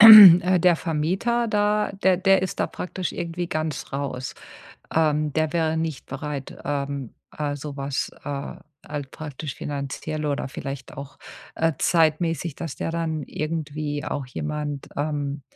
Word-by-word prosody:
äh, 185 Hz, -5 st, +11 dB
der 175 Hz, 0 st, +5 dB
Vermieter 185 Hz, +11 st, 0 dB
da 210 Hz, 0 st, +2 dB
der 185 Hz, -1 st, +5 dB
der 190 Hz, +1 st, +4 dB
ist 190 Hz, -, -3 dB
da -, -, +2 dB
praktisch 180 Hz, 0 st, -4 dB
irgendwie 175 Hz, 0 st, -3 dB
ganz 155 Hz, -5 st, -3 dB
raus. 135 Hz, -2 st, -3 dB, 0.6 s
Ähm, 150 Hz, -2 st, +2 dB
der 155 Hz, 0 st, +1 dB
wäre 160 Hz, -2 st, +1 dB
nicht 160 Hz, -3 st, -3 dB
bereit, 140 Hz, 0 st, -5 dB
ähm, 140 Hz, -3 st, -3 dB, 0.2 s
äh, 145 Hz, -1 st, -1 dB
sowas, 140 Hz, -1 st, -3 dB
äh, 140 Hz, +1 st, -4 dB, 0.3 s
halt 145 Hz, -3 st, -5 dB
praktisch 150 Hz, -2 st, -6 dB
finanziell 145 Hz, +2 st, -4 dB
oder 145 Hz, -1 st, -1 dB
vielleicht 135 Hz, 0 st, -6 dB
auch, 140 Hz, +1 st, -8 dB, 0.4 s
äh, 165 Hz, 0 st, +2 dB
zeitmässig, 165 Hz, -1 st, +2 dB
dass 165 Hz, -3 st, -6 dB
der -, -, -2 dB
dann 165 Hz, -2 st, -2 dB
irgendwie 150 Hz, 0 st, -3 dB
auch 140 Hz, -, -3 dB
jemand, 150 Hz, +1 st, -4 dB
ähm, 145 Hz, -1 st, -2 dB
155 Hz, 140 wpm, -24 LUFS, 145-170 Hz, 0.6 s, äh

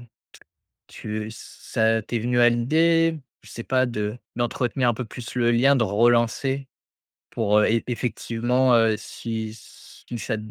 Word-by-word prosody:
t 120 Hz, -, -16 dB, 0.8 s
tu 110 Hz, 0 st, -6 dB
ç -, -, -10 dB
ça 115 Hz, -1 st, -1 dB
t'es 115 Hz, +2 st, -3 dB
venu 120 Hz, +2 st, 0 dB
à 120 Hz, 0 st, +7 dB
l'idée, 160 Hz, +7 st, +2 dB, 0.2 s
je -, -, -16 dB
sais 115 Hz, -, -7 dB
pas, 130 Hz, -1 st, +1 dB
de 105 Hz, -1 st, -3 dB, 0.2 s
d'entretenir 120 Hz, +1 st, 0 dB
un -, -, +1 dB
peu 125 Hz, -, -5 dB
plus 115 Hz, +1 st, -9 dB
le 120 Hz, -1 st, +2 dB
lien, 135 Hz, +4 st, +4 dB
de 120 Hz, -, +2 dB
relancer 120 Hz, +5 st, +1 dB, 0.6 s
pour, 105 Hz, -2 st, +2 dB
heu, 105 Hz, -, +4 dB
e 115 Hz, +1 st, +2 dB
effectivement, 125 Hz, +1 st, 0 dB
heu, 115 Hz, -1 st, +3 dB
si 110 Hz, 0 st, -6 dB
si 120 Hz, +2 st, -12 dB
ça 110 Hz, -, -3 dB
120 Hz, 160 wpm, -24 LUFS, 110-125 Hz, 0.8 s, à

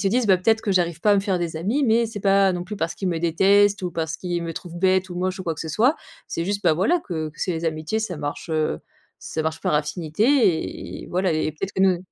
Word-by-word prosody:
se 195 Hz, -, +2 dB
disent: 245 Hz, +3 st, +1 dB
«Bah, 190 Hz, -2 st, +5 dB
peut-être 220 Hz, +4 st, +2 dB
que 200 Hz, -, 0 dB
j'arrive 170 Hz, -3 st, 0 dB
pas 210 Hz, -, +3 dB
à -, -, +5 dB
me -, -, +3 dB
faire 195 Hz, -2 st, 0 dB
des 165 Hz, -2 st, -3 dB
amis, 220 Hz, -, 0 dB
mais 230 Hz, 0 st, +3 dB
c'est 215 Hz, -2 st, -7 dB
pas 195 Hz, -1 st, +4 dB
non 175 Hz, -1 st, -3 dB
plus 210 Hz, +3 st, -6 dB
parce 165 Hz, -3 st, -2 dB
qu'ils 190 Hz, -, -3 dB
me 165 Hz, -2 st, -1 dB
détestent 195 Hz, +4 st, +3 dB
ou 180 Hz, -, -2 dB
parce 160 Hz, -1 st, -3 dB
qu'ils 175 Hz, -2 st, -3 dB
me 165 Hz, -, -4 dB
trouvent 175 Hz, -1 st, -7 dB
bête 190 Hz, 0 st, +2 dB
ou 175 Hz, -, -6 dB
moche 185 Hz, +1 st, -2 dB
ou 185 Hz, -, -7 dB
quoi 165 Hz, -2 st, -1 dB
que -, -, -9 dB
ce 160 Hz, -, -4 dB
soit». 245 Hz, -, +2 dB, 0.3 s
C'est 165 Hz, -, -3 dB
juste, 200 Hz, +1 st, -2 dB
bah, 165 Hz, -3 st, +5 dB
voilà, 220 Hz, -, +2 dB
que 160 Hz, -, -4 dB
que 150 Hz, -, -16 dB
c'est 185 Hz, -, 0 dB
les 165 Hz, 0 st, -4 dB
amitiés 155 Hz, +7 st, -2 dB
ça 190 Hz, -6 st, -3 dB
marche, 145 Hz, +3 st, -5 dB
heu, 155 Hz, -, 0 dB, 0.4 s
ça 160 Hz, -, -4 dB
marche 160 Hz, 0 st, -3 dB
par -, -, 0 dB
affinité 175 Hz, -, 0 dB
et -, -, -12 dB
voilà, 185 Hz, -1 st, 0 dB
et 155 Hz, 0 st, 0 dB
peut-être 195 Hz, +6 st, -5 dB
que 190 Hz, -, +1 dB
nous 185 Hz, -2 st, +4 dB
180 Hz, 275 wpm, -23 LUFS, 165-200 Hz, 0.4 s, Bah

